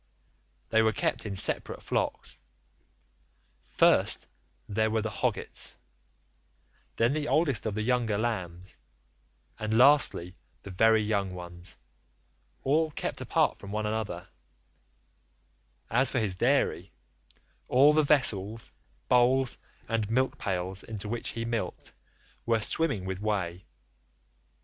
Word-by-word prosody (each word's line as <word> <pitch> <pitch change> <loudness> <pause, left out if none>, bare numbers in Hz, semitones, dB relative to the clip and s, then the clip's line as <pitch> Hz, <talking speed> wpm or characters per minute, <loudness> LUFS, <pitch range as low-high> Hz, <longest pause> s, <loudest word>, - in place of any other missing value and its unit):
They 110 0 +4
were 110 -1 +2
kept - - -1
in 100 - -4
separate - - 0
flocks; - - -2 1.2
first 65 +1 +3 0.4
there 110 +1 +1
were 110 -1 0
the 110 - -3
hoggets, - - -2 1.2
then 115 +4 +2
the 150 -1 -2
oldest 145 -9 +1
of 105 - -3
the 110 - -1
younger 120 -3 +1
lambs 95 -5 -4 0.8
and 110 +1 0
lastly 125 -9 +4 0.3
the 100 - -8
very 110 +3 +4
young 100 -3 -1
ones80 85 0 -9 0.9
all 155 +4 +2
kept 150 - -4
apart - - +1
from 100 - -10
one 105 +1 -2
another; 105 -5 -3 1.6
as 130 +3 +3
for 130 - -2
his 105 -6 0
dairy, 120 -5 +1 0.8
all 140 +4 +5
the 155 - +4
vessels, 115 -7 +1 0.4
bowls, 125 +1 +3 0.3
and 110 -2 -1
milk 130 +3 0
pails 95 -1 -2
into 105 -2 -7
which 120 +2 -3
he 115 0 -4
milked, 115 -1 -4 0.5
were 115 -1 +3
swimming 125 - -1
with 95 0 -4
whey. 95 -4 -2
110 Hz, 120 wpm, -28 LUFS, 95-125 Hz, 1.6 s, all